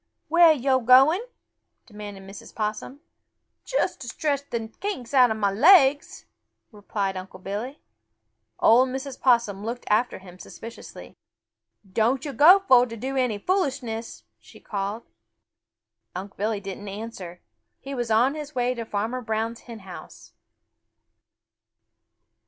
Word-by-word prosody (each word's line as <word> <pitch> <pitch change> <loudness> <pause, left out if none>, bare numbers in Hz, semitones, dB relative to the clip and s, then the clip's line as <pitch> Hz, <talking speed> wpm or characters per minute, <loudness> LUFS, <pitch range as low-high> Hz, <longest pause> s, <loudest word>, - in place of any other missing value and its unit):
"Where 340 +1 +6
are 320 - +7
yo' 265 -2 +1
going?" 265 - +5 0.6
demanded 205 -3 -10
Mrs. 195 +1 -12
Possum. 215 +6 -4 0.6
"Just - - -2
to - - -8
stretch 285 -2 -2
the 225 -2 -4
kinks 390 - -5
out 255 -2 +6
of 220 - -2
mah 200 -2 +1
legs," 290 - +4 0.5
replied 205 -2 -4
Unc' 185 0 -9
Billy. 220 +9 -5 0.8
Old 250 +3 +5
Mrs. 265 0 -6
Possum 235 -6 +2
looked 235 +3 -5
after 230 +4 +1
him 185 -1 -14
suspiciously. 230 +4 -11 0.7
"Don't 230 +8 0
yo' 285 - -5
go 355 - +7
fo' 250 -1 +6
to 230 -1 -8
do 265 +5 -4
any 250 -5 0
foolishness!" 245 - -3 0.2
she - - -17
called. 205 +3 -4 1.1
Unc' 190 +2 -7
Billy 215 +1 -2
didn't 200 +1 -8
answer. 195 -4 -8 0.4
He 275 - -8
was 240 -3 -3
on 235 +5 +3
his 300 -1 -8
way 250 0 0
to 235 -2 -6
Farmer 220 +4 -3
Brown's 225 0 -3
hen 230 -3 -11
house. 190 -2 -12
235 Hz, 135 wpm, -24 LUFS, 205-265 Hz, 1.1 s, are